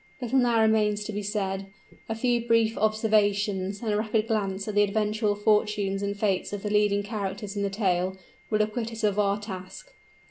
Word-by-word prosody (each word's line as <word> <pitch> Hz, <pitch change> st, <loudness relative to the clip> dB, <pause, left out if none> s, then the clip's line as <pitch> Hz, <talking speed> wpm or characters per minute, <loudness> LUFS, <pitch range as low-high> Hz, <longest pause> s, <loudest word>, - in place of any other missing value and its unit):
Little 255 Hz, +1 st, +1 dB
now 240 Hz, -2 st, +3 dB
remains 215 Hz, -1 st, +2 dB
to 215 Hz, -, -5 dB
be 205 Hz, -, -2 dB
said; 195 Hz, -2 st, -2 dB, 0.4 s
a 225 Hz, -, -1 dB
few 240 Hz, 0 st, +1 dB
brief 230 Hz, -1 st, +3 dB
observations 205 Hz, -2 st, +1 dB
and 215 Hz, -2 st, 0 dB
a -, -, +1 dB
rapid 215 Hz, 0 st, 0 dB
glance 195 Hz, -2 st, -1 dB
at 215 Hz, -, -3 dB
the 205 Hz, -, +4 dB
eventual 210 Hz, +1 st, +1 dB
fortunes 210 Hz, -2 st, +1 dB
and 200 Hz, 0 st, -2 dB
fates 200 Hz, -3 st, 0 dB
of 205 Hz, -1 st, -5 dB
the 210 Hz, -, -2 dB
leading 205 Hz, -1 st, +2 dB
characters 205 Hz, -1 st, -4 dB
in 200 Hz, -, -2 dB
the 200 Hz, -, 0 dB
tale, 190 Hz, -2 st, 0 dB, 0.3 s
will 215 Hz, -1 st, +3 dB
acquit 225 Hz, +2 st, -3 dB
us 225 Hz, -1 st, -7 dB
of 210 Hz, -1 st, +2 dB
our 200 Hz, 0 st, +2 dB
task. 200 Hz, -, -9 dB
210 Hz, 190 wpm, -27 LUFS, 200-220 Hz, 0.4 s, the